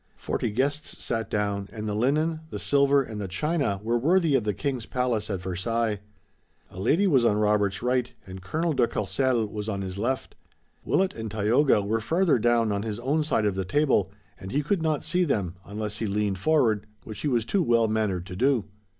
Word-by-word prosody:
Forty - - -2
guests 140 +7 -1
sat 115 -1 -2
down, 100 -2 -1
and 110 -1 -5
the 105 - -1
linen, 150 +8 +1
the - - -5
silver 140 0 +3
and 110 -4 -6
the 100 - -3
china 140 - -1
were 120 +2 +1
worthy 165 +3 +3
of 125 -5 +2
the 105 - 0
King's 135 -6 -3
palace 125 -4 -1
at 95 -3 -3
Versailles. 105 +4 -1 0.7
A 95 - -9
lady 155 - +2
was 140 -10 +4
on 105 -3 +3
Robert's 105 -1 +1
right 125 0 +1
and 95 0 -9
Colonel 160 - -1
de 125 -4 +3
Courcelles 120 -6 0
was 105 0 -4
on 100 -2 -2
his 95 0 -6
left. 130 +5 -2 0.5
Willet 190 0 +1
and 110 -1 -5
Tayoga 110 +3 +3
were 110 +3 -1
farther 165 - +2
down 115 -1 +2
on 100 0 -1
his 110 0 -4
own 145 +5 +1
side 115 -8 +1
of 105 - +1
the 95 0 -2
table, 105 -3 +1 0.3
and 95 - -8
he 145 +2 0
could 180 +4 0
not 155 -2 0
see 180 0 +1
them, 100 - -1
unless 105 0 -4
he 110 - -2
leaned 100 -1 -1
forward, 115 -7 +2 0.2
which 110 -2 -8
he - - -2
was 120 -5 +1
too 195 - +1
well 115 -6 +3
mannered 105 -5 -1
to 90 -1 -8
do. 130 +1 +2
115 Hz, 205 wpm, -26 LUFS, 105-140 Hz, 0.7 s, was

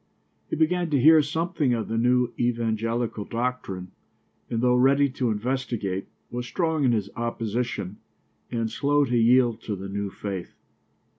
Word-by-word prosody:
He - - -1
began 170 +2 +1
to 145 -3 +2
hear 155 +4 +7
something 155 -3 0
of 115 - -3
the 115 - -3
new 125 +1 +2
evangelical 115 -1 -1
doctrine 115 -6 -3 0.6
and 115 - -1
though 125 +1 +3
ready 140 +3 +4
to 125 -2 -1
investigate, 110 -4 -2 0.2
was 125 0 -4
strong 160 -3 0
in 130 - +4
his 105 -4 -1
opposition 115 -3 -3 0.5
and 115 -2 -2
slow 145 +3 +2
to 125 -2 -1
yield 120 0 +4
to 105 - -3
the 95 +1 -7
new 100 0 -3
faith. 95 -2 -6
120 Hz, 150 wpm, -25 LUFS, 110-135 Hz, 0.6 s, hear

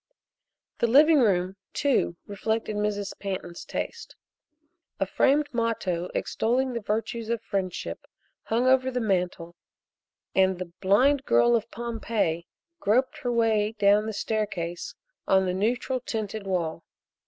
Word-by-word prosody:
The 235 - +3
living 295 +6 +6
room, 190 -5 +2 0.2
too, 270 - +1
reflected 220 +2 -2
Mrs. 205 -1 -1
Pantin's 185 -3 -5
taste. 465 -1 -5 0.8
A - - +2
framed 290 +2 +2
motto 210 -7 -1
extolling 255 +3 0
the 235 - -2
virtues 220 +2 -2
of 235 0 0
friendship 195 -4 -4 0.4
hung 235 +3 +1
over 260 0 +4
the 250 -1 -2
mantel 180 -5 -1 0.8
and 190 -1 +3
the 180 -1 -6
"Blind 260 +9 +4
Girl 240 -3 +4
of 230 0 -1
Pompeii" 225 -8 -2 0.3
groped 255 -1 +1
her 245 - -2
way 220 -2 +2
down 205 +1 +4
the - - -2
staircase 200 -6 -3 0.3
on 190 0 +4
the 180 - 0
neutral 245 +6 0
tinted 220 -4 -4
wall. 170 -3 -2
215 Hz, 130 wpm, -26 LUFS, 190-240 Hz, 0.8 s, living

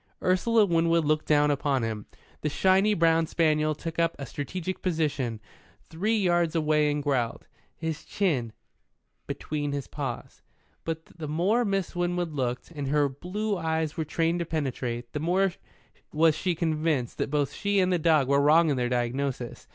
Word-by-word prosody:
Ursula 210 +4 +3
Winwood 165 -2 +2
looked 155 +1 +1
down 150 -1 +4
upon 140 -3 0
him. 110 -2 -4 0.3
The 150 - 0
shiny 190 +6 +3
brown 165 -1 +3
spaniel 155 -2 +1
took 165 +2 -5
up 165 0 +2
a 140 - -6
strategic 170 +8 -5
position 145 - -1 0.4
three 210 +8 -1
yards 175 -4 +2
away 150 -1 +2
and 145 0 -1
growled, 130 -5 -1 0.3
his 160 -1 -4
chin 140 - -1 0.8
between 145 -2 -3
his 140 -1 -3
paws. 135 -5 -6 0.4
But 160 0 -4
the 160 -2 -8
more 185 +11 +2
Miss 195 -5 -1
Winwood 175 -1 -1
looked, 125 +1 -3
and 145 -4 -5
her 145 +1 +3
blue 195 +10 -3
eyes 160 -1 -1
were 160 - -1
trained 165 +2 0
to 170 - -1
penetrate, 125 -6 -3
the 150 - -2
more 180 +4 +1 0.6
was 160 +1 +4
she 175 +2 -1
convinced 155 -6 -1
that - - -1
both 145 -2 0
she 200 -1 0
and 185 -1 +2
the 175 - +2
dog 155 -4 +3
were 140 +1 +3
wrong 155 +2 +5
in 140 - 0
their 125 -1 0
diagnosis. 125 +1 -2
155 Hz, 165 wpm, -27 LUFS, 140-175 Hz, 0.8 s, wrong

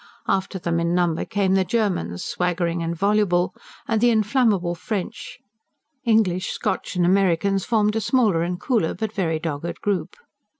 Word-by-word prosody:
After 190 0 0
them 170 -2 -1
in 170 +1 0
number 175 -2 +1
came 195 -2 0
the 190 0 +3
Germans, 185 - -1
swaggering 175 -1 -1
and 165 0 -2
voluble; 190 -1 +2 0.3
and 225 -2 +1
the 240 - +5
inflammable 215 -5 +2
French, 210 +2 -5 0.7
English, 200 -5 +2
Scotch - - -3
and 175 -1 +2
Americans 195 +1 +2
formed 210 -2 +2
a 225 - 0
smaller 215 -9 +2
and 175 +1 -2
cooler, 225 - 0
but 220 -1 -4
very 165 -6 0
dogged 160 +1 -4
group. 195 -7 -2
190 Hz, 155 wpm, -23 LUFS, 170-210 Hz, 0.7 s, the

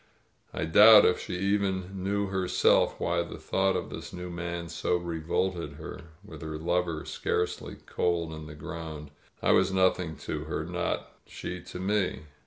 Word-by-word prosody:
I - - -2
doubt 105 +6 +9
if 90 - +3
she - - -5
even 95 -1 -1
knew 100 +1 0
herself 95 -2 +2
why 85 0 +1
the 85 - -6
thought 95 0 +1
of - - -3
this - - -7
new 90 0 -6
man 85 0 -4
so 85 +1 0
revolted 85 -1 -2
her, 75 - -9 0.2
with 80 -7 -10
her 80 -1 -5
lover 85 -1 -1
scarcely 90 0 -2
cold 85 -2 0
in 80 -1 -8
the 75 - -9
ground. 80 -2 -7 0.3
I - - +4
was 95 0 +4
nothing 95 -3 +2
to - - -3
her, - - -3
nor - - -1 0.3
she 90 0 -6
to 90 - -7
me. 100 -2 0
90 Hz, 165 wpm, -29 LUFS, 80-95 Hz, 0.3 s, doubt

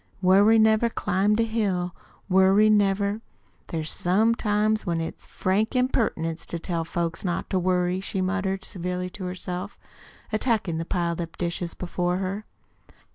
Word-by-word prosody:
"Worry 200 +4 +5
never 220 +1 +4
climbed 205 0 +1
a - - +4
hill, 195 -6 -1 0.3
Worry 195 +3 +5
never 200 0 +2 0.5
There's 160 -2 -3
some 210 +6 +2
times 215 -1 +1
when 170 -3 -1
it's 165 - -5
frank 205 +5 0
impertinence 215 -10 0
to 170 - -2
tell 170 0 -2
folks 165 0 -3
not 175 -3 -2
to 190 - +2
worry," 180 0 +1
she 195 - -3
muttered 190 +1 -1
severely 180 0 -4
to 185 0 -7
herself, 180 +1 -5 0.6
attacking 215 -7 0
the 165 - -3
piled 170 -1 -1
up 165 -1 -7
dishes 170 0 -3
before 180 0 -1
her. 195 +3 -3
190 Hz, 145 wpm, -25 LUFS, 175-210 Hz, 0.6 s, Worry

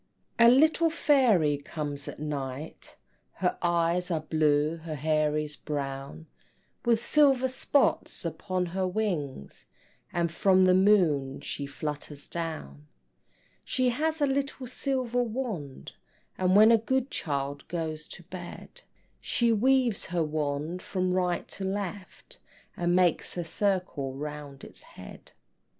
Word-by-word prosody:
A 235 0 +8
little 315 +6 +5
fairy 240 - +3
comes 145 -1 -5
at - - -7
night, 145 -1 -5 0.4
Her 180 -1 0
eyes 175 +1 +1
are 165 -3 0
blue, 155 0 +1
her 160 -1 -6
hair 155 0 +1
is 150 -1 -3
brown, 135 - -5 0.6
With 235 -2 +3
silver 270 0 +4
spots 260 -5 +1
upon 180 +3 -2
her 190 -1 0
wings, 175 - -3 0.4
And 170 -1 0
from 185 +2 +4
the 185 0 +5
moon 175 -9 +3
she 140 - -4
flutters 145 0 -5
down. 155 - -5 0.8
She 255 -1 +1
has 315 +6 -1
a - - +5
little 275 -1 -2
silver 250 -1 -1
wand, 220 - -4 0.4
And 185 0 +2
when 215 +2 +8
a 230 - +6
good 260 +4 -1
child 140 -1 -3
goes 160 -3 -3
to 175 - -9
bed 180 - -9 0.4
She 235 -2 +1
waves 250 -1 +2
her 170 -1 0
wand 150 +3 -2
from 185 -1 -1
right 180 -1 0
to 195 - -7
left, 195 0 -5 0.4
And 175 0 +1
makes 180 -1 +2
a 175 - -1
circle 175 -7 -1
round 145 -1 -7
its - - -5
head. - - -12
175 Hz, 130 wpm, -28 LUFS, 150-220 Hz, 0.8 s, A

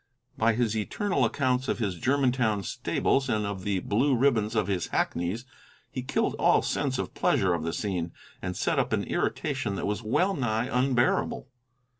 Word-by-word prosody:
By 115 +1 +3
his 115 -1 0
eternal 130 - 0
accounts 130 +2 0
of - - 0
his 105 -5 -1
Germantown 125 -1 +1
stables 135 +8 0
and 105 -2 +1
of 100 -2 -4
the 100 -2 0
blue 130 +6 +2
ribbons 115 -4 +2
of 110 - +2
his 95 -4 -1
hackneys 90 +9 -1 0.5
he 130 - -3
killed 125 - 0
all - - +4
sense - - -1
of - - -4
pleasure 95 -2 +2
of 85 - -1
the 80 +1 -2
scene, 90 -3 -2 0.3
and 90 -1 -4
set - - +1
up - - 0
an - - +1
irritation 100 - -1
that - - -3
was 105 +2 -1
well 160 - +1
nigh 120 - 0
unbearable. 125 -1 +1
110 Hz, 175 wpm, -27 LUFS, 100-130 Hz, 0.5 s, all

